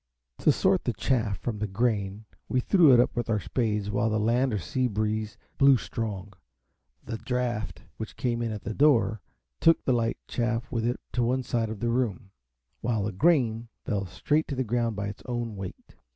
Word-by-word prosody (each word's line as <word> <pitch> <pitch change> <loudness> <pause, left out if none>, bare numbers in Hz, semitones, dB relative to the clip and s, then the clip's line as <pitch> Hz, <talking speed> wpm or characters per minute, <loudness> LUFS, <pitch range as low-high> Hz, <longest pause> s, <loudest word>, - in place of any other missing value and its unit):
To - - +5
sort - - +2
the - - 0
chaff 115 -7 0
from 105 +2 -4
the 105 - -1
grain 105 -1 -1 0.2
we 130 - +2
threw 165 +2 +5
it 125 - +7
up 120 - +2
with 120 -1 -2
our 110 -2 +2
spades 105 -2 -1
while 115 +2 +1
the 110 0 +1
land 120 +4 +2
or 105 - 0
sea 125 +8 -1
breeze 110 -1 -2 0.2
blew 135 -1 +7
strong. 105 -4 -5 0.7
The 110 - -5
draught 125 -3 -2
which 110 - -7
came 120 -2 -1
in 115 -1 -1
at 105 -2 -6
the 110 - -3
door 120 -6 +3 0.4
took 165 - +4
the 130 - +3
light 115 -1 0
chaff 120 +1 -1
with 115 -2 0
it 120 - -1
to 125 - 0
one 125 +2 +1
side 115 -2 -1
of 110 -2 -6
the 120 - +1
room, 115 -4 -1 0.5
while 110 -3 0
the 105 - -1
grain 120 - +2 0.2
fell 100 -4 -1
straight 150 - 0
to 140 - -3
the 130 - 0
ground 115 -1 0
by 100 0 -3
its 105 - -7
own 120 -3 -3
weight. 95 -2 -8
115 Hz, 200 wpm, -27 LUFS, 105-125 Hz, 0.7 s, it